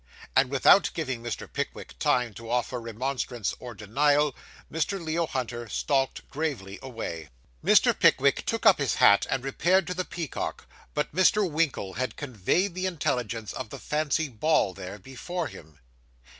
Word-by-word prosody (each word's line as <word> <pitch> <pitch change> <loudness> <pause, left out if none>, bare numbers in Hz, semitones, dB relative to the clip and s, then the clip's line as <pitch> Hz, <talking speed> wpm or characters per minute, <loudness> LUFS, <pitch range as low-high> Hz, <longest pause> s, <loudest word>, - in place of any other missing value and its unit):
And 130 -1 +4
without 140 +8 +5
giving 130 -8 -3
Mr. 120 -1 -5
Pickwick - - -5
time 125 -3 +1
to 115 +2 -10
offer 125 0 -1
remonstrance 120 -1 -3
or 120 -2 -8
denial, 145 +7 +2 0.4
Mr. 180 +5 -1
Leo 165 0 -1
Hunter 120 -4 -4
stalked 135 +1 0
gravely 135 -11 -4
away. 115 - -6 0.3
Mr. - - +5
Pickwick - - +3
took - - -1
up - - +7
his - - +1
hat, 100 - +5
and 130 - -1
repaired 175 +7 +2
to 180 - -3
the 185 +1 -2
Peacock, 170 -4 -5 0.3
but 150 - -1
Mr. 195 +2 +4
Winkle 150 - -1
had 130 +6 -3
conveyed 145 - 0
the 185 +1 -1
intelligence 125 - -2
of 130 -4 -6
the - - -7
fancy 155 +1 0
ball 130 -4 +1
there, 95 +1 -7
before 135 - -5
him. 80 - -11
135 Hz, 155 wpm, -27 LUFS, 115-160 Hz, 0.4 s, up